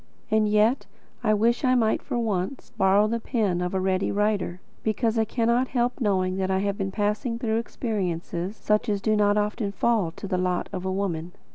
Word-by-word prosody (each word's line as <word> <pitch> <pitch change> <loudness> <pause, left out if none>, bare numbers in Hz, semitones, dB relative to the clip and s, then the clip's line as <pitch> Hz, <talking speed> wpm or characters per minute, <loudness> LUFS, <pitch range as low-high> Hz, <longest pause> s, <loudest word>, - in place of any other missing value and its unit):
And 215 -1 +3
yet 215 +5 +3 0.4
I 215 -2 +3
wish 230 +5 +2
I 255 -1 +4
might, 225 -3 +2
for - - -3
once, 215 0 -2
borrow 195 0 +4
the 230 +2 -1
pen 210 -7 0
of 180 +1 -2
a - - +2
ready 185 0 0
writer; 205 -3 0 0.2
because 225 +1 0
I 220 - +3
cannot 235 +3 +1
help 245 0 -1
knowing 185 -4 +1
that 190 -1 -1
I 190 - +2
have 200 +1 0
been 195 -1 -1
passing 210 +4 -1
through 225 -2 0
experiences 190 -5 -3
such 210 0 0
as 205 -1 +1
do 215 +2 +1
not 205 0 +3
often 210 0 -1
fall 210 -2 +1
to 170 - -9
the 185 -2 0
lot 180 -1 -1
of 185 -1 -4
a 190 - 0
woman. 180 -3 -2
210 Hz, 205 wpm, -25 LUFS, 190-225 Hz, 0.4 s, I